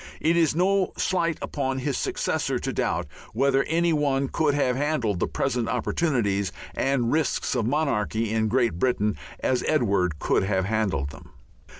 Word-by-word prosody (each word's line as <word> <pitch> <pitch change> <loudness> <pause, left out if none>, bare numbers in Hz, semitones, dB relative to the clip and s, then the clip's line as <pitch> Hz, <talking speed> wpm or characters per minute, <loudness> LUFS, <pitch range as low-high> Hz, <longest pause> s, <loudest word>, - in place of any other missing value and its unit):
It 165 +2 +2
is 165 -4 +3
no 190 +2 +2
slight 170 -3 0
upon 135 -2 -2
his 135 +1 -1
successor - - -1
to - - -3
doubt - - -1 0.3
whether 135 0 +3
any 170 +1 +1
one 140 -3 +1
could 150 -3 +1
have 130 -3 +1
handled 130 - 0
the - - +1
present 125 -4 -1
opportunities 100 - 0 0.2
and 130 -3 0
risks 155 -2 0
of 120 -4 0
monarchy 115 -6 0
in 110 0 +1
Great 115 -6 +1
Britain 105 -4 +1 0.3
as 130 -1 +1
Edward 100 - +1
could - - +1
have 95 -1 0
handled 100 -10 -1
them. - - -13
130 Hz, 160 wpm, -25 LUFS, 110-150 Hz, 0.3 s, is